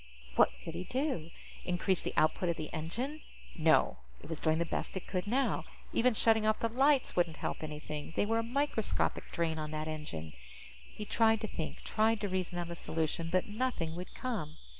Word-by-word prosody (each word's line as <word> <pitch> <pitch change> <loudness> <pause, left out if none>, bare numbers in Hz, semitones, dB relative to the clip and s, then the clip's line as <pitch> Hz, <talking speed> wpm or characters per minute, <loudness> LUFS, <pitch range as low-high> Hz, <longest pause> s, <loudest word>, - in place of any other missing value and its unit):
What - - +7
could 165 - -5
he 175 +2 -4
do? 255 - -1 0.3
Increase 180 +1 +1
the - - -3
output 165 +3 +3
of 170 - 0
the 155 - -5
engine? 235 - -3 0.3
No. - - +4 0.2
It - - -12
was 160 - -3
doing 160 0 +2
the 170 - +1
best 170 - -2
it 190 - -5
could 185 0 -2
now. 265 +5 +2 0.3
Even 245 0 +4
shutting 220 0 +4
off 215 0 +3
the 230 - +1
lights 270 +3 +3
wouldn't 170 -3 +2
help - - -3
anything; 150 -1 -5
they - - +3
were 225 +2 +2
a - - 0
microscopic 230 - 0
drain 160 -2 0
on 155 0 -3
that 155 0 -3
engine. 85 - -5 0.6
He 210 - -6
tried 225 0 +4
to 220 - -1
think, 160 -6 -5
tried 220 0 +2
to 205 - 0
reason 185 -2 -2
out 170 -1 -3
a - - -4
solution, 165 0 -1
but 185 0 +3
nothing 210 -7 -1
would 180 +1 -7
come. 180 -12 -3
180 Hz, 200 wpm, -33 LUFS, 160-225 Hz, 0.6 s, What